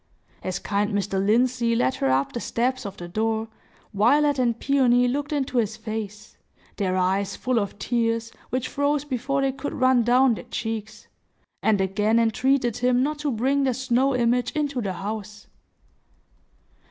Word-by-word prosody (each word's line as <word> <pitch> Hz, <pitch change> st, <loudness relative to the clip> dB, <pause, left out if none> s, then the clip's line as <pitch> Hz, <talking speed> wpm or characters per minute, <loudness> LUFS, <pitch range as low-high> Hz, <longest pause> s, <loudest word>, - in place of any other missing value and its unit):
As 185 Hz, -1 st, -3 dB
kind 205 Hz, +1 st, -1 dB
Mr. 195 Hz, -1 st, 0 dB
Lindsey 235 Hz, +2 st, +2 dB
led 130 Hz, -, +2 dB
her 135 Hz, -, 0 dB
up 135 Hz, +1 st, +1 dB
the 240 Hz, -, -3 dB
steps 250 Hz, 0 st, -1 dB
of 200 Hz, -, -9 dB
the 175 Hz, -, -7 dB
door, 220 Hz, +4 st, -1 dB, 0.4 s
Violet 280 Hz, +7 st, +3 dB
and 235 Hz, -2 st, +1 dB
Peony 250 Hz, -3 st, +3 dB
looked 285 Hz, +4 st, -2 dB
into 265 Hz, -4 st, 0 dB
his 215 Hz, -1 st, -1 dB
face,—their 210 Hz, -3 st, -6 dB
eyes 190 Hz, +2 st, 0 dB
full 255 Hz, -2 st, 0 dB
of 200 Hz, -1 st, -4 dB
tears, 230 Hz, 0 st, -1 dB, 0.2 s
which 255 Hz, 0 st, -2 dB
froze 285 Hz, 0 st, 0 dB
before 275 Hz, 0 st, -1 dB
they 270 Hz, -, +2 dB
could 275 Hz, +2 st, -5 dB
run 255 Hz, -1 st, +4 dB
down 250 Hz, +2 st, +4 dB
their -, -, -7 dB
cheeks,—and 220 Hz, -1 st, -4 dB
again 205 Hz, +4 st, +1 dB
entreated 240 Hz, +1 st, +1 dB
him 250 Hz, 0 st, +2 dB
not 300 Hz, +1 st, -2 dB
to 295 Hz, 0 st, -1 dB
bring 265 Hz, +4 st, +1 dB
their 260 Hz, -3 st, +1 dB
snow 260 Hz, +1 st, +1 dB
image 245 Hz, 0 st, +1 dB
into 285 Hz, -4 st, -1 dB
the 195 Hz, -4 st, -2 dB
house. 210 Hz, +2 st, -6 dB
235 Hz, 155 wpm, -24 LUFS, 210-260 Hz, 0.4 s, run